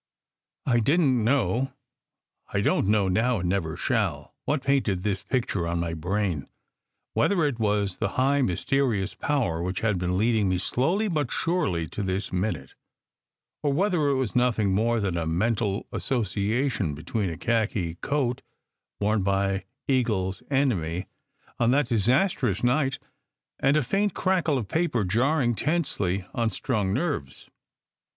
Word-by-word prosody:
I 120 -2 +3
didn 140 +2 +3
t - - -1
know 135 0 +1 0.8
(I 100 - +1
don - - +2
t - - 0
know 105 -2 +3
now, 110 +6 +2
and 90 - -1
never 85 -4 -1
shall) 100 - -1
what 145 -3 0
painted 130 -10 +1
this 100 -3 -1
picture 105 -7 -1
on 85 0 -1
my 85 -1 -2
brain: 90 -2 -1 0.7
whether 190 -5 +2
it 135 -5 -1
was 105 -3 0
the - - +1
high, 140 +2 +3
mysterious 115 0 0
Power 120 - -1
which 90 +2 -2
had 105 -5 +1
been 90 +1 0
leading 110 -1 +2
me 90 - +1
slowly 165 - +1
but 155 -7 0
very - - -2
surely 100 - 0
to - - -5
this 95 0 -2
minute, 90 - -2 0.9
or 145 - +1
whether 175 -2 +2
it 140 - +2
was 130 -4 -1
nothing 115 -5 +2
more 115 +4 +2
than 95 -4 -1
a 80 -1 -1
mental 105 +4 0
association 110 - -1
between 95 +6 -2
a 80 - -5
khaki 110 -7 0
coat 135 -4 0 0.6
worn 105 +1 +1
by 100 0 0 0.2
Eagle 115 -8 +1
s 95 - -8
enemy 100 - 0 0.5
on 120 -1 +3
that 135 0 +2
disastrous 125 - +1
night 135 +2 +2 0.6
and 140 +3 +3
a 150 - +2
faint 195 - 0
crackle 180 -6 +1
of 115 -6 -3
paper 160 - 0
jarring 120 - +2
tensely 105 - -1
on 115 -1 +1
strung 105 -2 -1
nerves. 125 - -3
110 Hz, 155 wpm, -26 LUFS, 95-135 Hz, 0.9 s, I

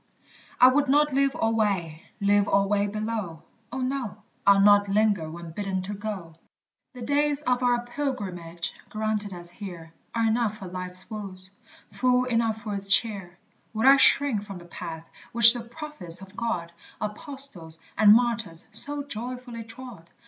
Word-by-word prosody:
I 250 - +9
would 280 +1 +1
not 295 +1 +3
live 275 0 +2
alway 200 -8 0 0.2
live 205 0 +3
alway 200 +1 +2
below! 215 -5 -4 0.3
Oh 260 +1 -4
no, 255 -5 -3 0.2
I'll 200 0 +7
not 205 0 +5
linger 205 -5 +1
when 170 0 -9
bidden 190 +1 -3
to 200 +2 -5
go: 195 -6 -6 0.6
The 245 - -7
days 290 +2 +1
of 250 -3 0
our 245 -1 +1
pilgrimage 190 -11 -4 0.2
granted 215 -1 -2
us 175 -1 -4
here 175 -4 -9 0.2
Are 230 -1 +1
enough 220 -1 0
for 195 - -9
life's 185 0 -5
woes, 190 -4 -7 0.4
full 250 0 +2
enough 230 -3 0
for 210 - -4
its 200 0 -3
cheer: 200 -5 +3 0.4
Would 220 - 0
I 275 +1 +8
shrink 270 -4 +4
from 200 -2 -9
the 175 - -12
path 165 -1 -8 0.3
which 235 0 +9
the 240 - -5
prophets 235 - -8
of 195 +1 -13
God, 185 -8 -3 0.3
Apostles, 210 - -3 0.2
and 210 -1 +6
martyrs, 225 -9 +2
so 285 +6 -1
joyfully 245 -2 -7
trod? 225 -6 -12
215 Hz, 155 wpm, -26 LUFS, 185-245 Hz, 0.6 s, I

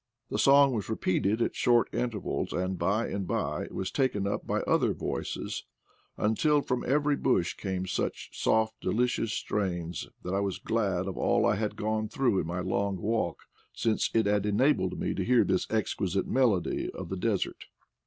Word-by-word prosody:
The - - -1
song 140 -1 +6
was 110 -3 -3
repeated 110 +1 +1
at - - -2
short 120 -1 +3
intervals, 120 -4 -2
and 95 +1 -1
by 100 +7 +1
and 100 -2 -3
by - - -1
it - - -12
was 95 - -3
taken 130 -8 0
up 100 - -2
by - - 0
other - - +2
voices, - - -4 0.5
until 145 +8 +2
from 125 -1 -1
every 145 +2 +2
bush 90 -9 +1
came 95 -2 -3
such 95 - -3
soft 110 0 +1
delicious 120 -1 0
strains 90 -6 -2
that 90 - -3
I 100 - +2
was 100 -2 -1
glad 100 -5 0
of 95 - -4
all - - +2
I - - +4
had 105 +1 -2
gone 110 0 -1
through 120 -5 +1
in 80 - -2
my 90 +2 -2
long 100 +1 -1
walk, 105 -3 -1 0.3
since 110 -2 0
it 110 -2 +4
had 105 0 +1
enabled 105 -4 +2
me - - -1
to - - -2
hear 125 -1 +4
this 95 -1 0
exquisite 100 -3 0
melody 120 -9 +1
of - - -6
the 95 - -2
desert. 100 +1 -1
105 Hz, 180 wpm, -29 LUFS, 95-115 Hz, 0.5 s, song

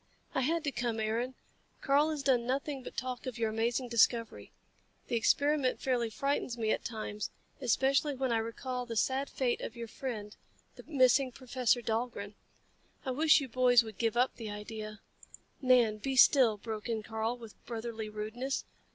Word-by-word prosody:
"I - - +1
had 325 +5 +1
to 285 - -1
come, 240 -3 -2
Aaron. 230 +4 -1 0.5
Karl 285 +3 +3
has 300 -3 -3
done 250 -4 +2
nothing 275 +1 -2
but - - -10
talk 255 0 -4
of 250 -2 -4
your 225 -2 0
amazing 235 +3 0
discovery. 235 -1 +2 0.6
The - - 0
experiment 285 +3 +2
fairly 245 -3 0
frightens 270 0 -1
me 220 -2 0
at - - 0
times 215 -2 -4 0.3
especially 270 +3 +2
when 260 -1 -1
I 230 - +3
recall 245 +2 -4
the 230 - -4
sad 265 +5 +1
fate 250 -3 -1
of 230 - -5
your 235 -1 -6
friend, 220 -4 -6 0.4
the - - -10
missing 260 -2 +4
Professor 250 -1 0
Dahlgren. 220 -3 -2 0.7
I 260 - -1
wish 305 +3 +5
you 275 - -4
boys 245 0 +5
would 220 -3 -10
give 230 0 0
up 250 +2 +2
the 225 -3 -6
idea 215 0 -7 0.3
" - - -20
"Nan, 245 -5 +4
be 265 +5 -2
still," 245 -4 +6
broke 220 +1 -6
in 220 -2 -1
Karl, 220 +2 -2
with 230 -3 -13
brotherly 225 -2 -4
rudeness. 220 +6 -3
240 Hz, 175 wpm, -32 LUFS, 225-265 Hz, 0.7 s, still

